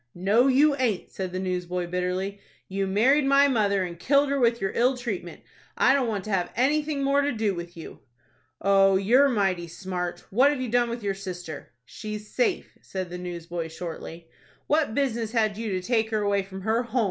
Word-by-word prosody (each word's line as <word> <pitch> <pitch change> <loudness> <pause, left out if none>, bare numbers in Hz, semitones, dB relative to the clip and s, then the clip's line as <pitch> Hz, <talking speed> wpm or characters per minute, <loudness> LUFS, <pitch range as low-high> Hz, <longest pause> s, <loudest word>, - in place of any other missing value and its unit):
"No, 205 +8 +3
you 280 +2 +4
aint," 235 -8 -1
said 185 -2 -4
the 185 - -4
newsboy, 180 -1 -2
bitterly. 180 +3 -2 0.3
"You 195 0 -2
married 250 +10 +3
my 275 +1 +5
mother, 205 -7 +1
and 170 -2 -6
killed 280 +8 +3
her 280 0 0
with 235 -1 +2
your 195 - -1
ill 250 +2 +2
treatment. 205 -8 -5 0.4
I 265 - +5
don't 270 -3 +1
want 205 -4 -2
to 215 - -6
have 185 -3 0
anything 290 +3 +1
more 280 +1 +3
to 285 0 0
do 215 -3 0
with 170 -1 -8
you." 165 - -10 0.6
"Oh, 195 0 +4
you're 240 +9 +4
mighty 190 -7 0
smart. 180 0 -5
What 255 +8 +5
have 290 -2 -1
you 255 -2 -3
done 240 +1 +2
with 235 -1 -5
your 200 -1 0
sister?" 180 -8 -8
"She's 215 - -8
safe," 435 -7 -1
said 185 -2 -5
the 180 - -5
newsboy, 170 -1 -5
shortly. 165 0 -8 0.4
"What 295 -6 +1
business 235 -5 -1
had 215 -3 +1
you 225 +1 -4
to 185 -1 -2
take 225 -3 +1
her 215 -2 0
away 200 -1 +2
from 190 0 -9
her 220 +4 +1
home?" 245 +1 -2
205 Hz, 200 wpm, -26 LUFS, 185-250 Hz, 0.6 s, my